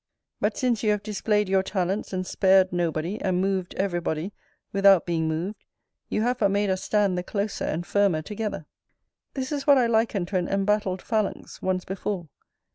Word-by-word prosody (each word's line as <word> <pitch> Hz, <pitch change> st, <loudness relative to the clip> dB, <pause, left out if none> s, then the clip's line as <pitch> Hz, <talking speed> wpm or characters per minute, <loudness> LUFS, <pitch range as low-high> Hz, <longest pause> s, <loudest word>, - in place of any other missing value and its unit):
But -, -, 0 dB
since 245 Hz, -5 st, +1 dB
you 215 Hz, -, +1 dB
have 210 Hz, -1 st, +1 dB
displayed 210 Hz, 0 st, 0 dB
your 190 Hz, 0 st, +3 dB
talents, 190 Hz, +1 st, -2 dB
and 185 Hz, -1 st, -2 dB
spared 190 Hz, -1 st, +3 dB
nobody, 170 Hz, +3 st, -1 dB
and 185 Hz, -2 st, +1 dB
moved 190 Hz, -1 st, -1 dB
every 190 Hz, -3 st, 0 dB
body, 165 Hz, +4 st, -3 dB, 0.4 s
without 195 Hz, -2 st, +5 dB
being 165 Hz, -2 st, 0 dB
moved, 170 Hz, +7 st, -3 dB, 0.5 s
you 215 Hz, -, 0 dB
have 250 Hz, +1 st, 0 dB
but 205 Hz, -4 st, +3 dB
made 200 Hz, 0 st, +1 dB
us 185 Hz, 0 st, -1 dB
stand 200 Hz, -4 st, +1 dB
the -, -, -4 dB
closer 200 Hz, +2 st, -2 dB
and 170 Hz, +3 st, -2 dB
firmer 195 Hz, -5 st, +2 dB
together. 210 Hz, -4 st, -4 dB, 0.7 s
This 265 Hz, 0 st, -3 dB
is 290 Hz, 0 st, -3 dB
what 285 Hz, -1 st, +7 dB
I 250 Hz, -, +4 dB
likened 225 Hz, -5 st, +1 dB
to 195 Hz, -, 0 dB
an 180 Hz, -, -1 dB
embattled 195 Hz, -1 st, 0 dB
phalanx, 215 Hz, -3 st, -2 dB
once 185 Hz, -1 st, -1 dB
before. 190 Hz, -3 st, -4 dB
195 Hz, 185 wpm, -25 LUFS, 180-210 Hz, 0.7 s, what